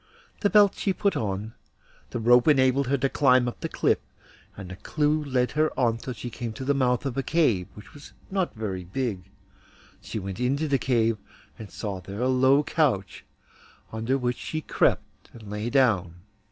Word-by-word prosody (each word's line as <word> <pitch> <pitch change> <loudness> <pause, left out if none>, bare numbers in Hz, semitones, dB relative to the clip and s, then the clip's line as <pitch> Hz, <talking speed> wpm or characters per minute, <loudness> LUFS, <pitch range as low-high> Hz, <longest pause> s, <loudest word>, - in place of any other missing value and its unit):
The 205 - +2
belt 205 -1 +6
she 195 - -1
put 200 +1 0
on, 105 +1 -3 0.6
the - - -4
rope 120 +3 +5
enabled 135 -2 +4
her 140 +2 +1
to 135 +1 +1
climb 130 -3 +3
up 120 - -5
the - - -4
cliff, - - +1 0.6
and 95 -2 -8
the - - -6
clew 150 - 0
led 130 -3 0
her 155 +1 +1
on 115 -3 +2
till 125 - -5
she 120 +1 -7
came 115 0 -5
to 130 - -7
the 140 - +2
mouth 125 -2 +1
of 135 -2 -3
a - - +2
cave, 125 - +1
which 105 - -13
was 145 - -13 0.2
not 190 -6 -1
very 100 -5 -4
big. 100 -1 -4 0.7
She - - -6
went 95 0 -5
into 140 +5 0
the 140 -2 +1
cave, 115 -3 +1 0.4
and 110 -3 -8
saw 100 -4 -5
there 100 +3 -8
a 125 - +2
low 130 +3 +4
couch, 130 - 0 0.7
under 115 +4 -1
which 125 -2 -1
she 155 - -4
crept - - -1
and 110 -3 -11
lay 105 +3 -3
down. 110 -11 +2
125 Hz, 190 wpm, -26 LUFS, 110-140 Hz, 0.7 s, belt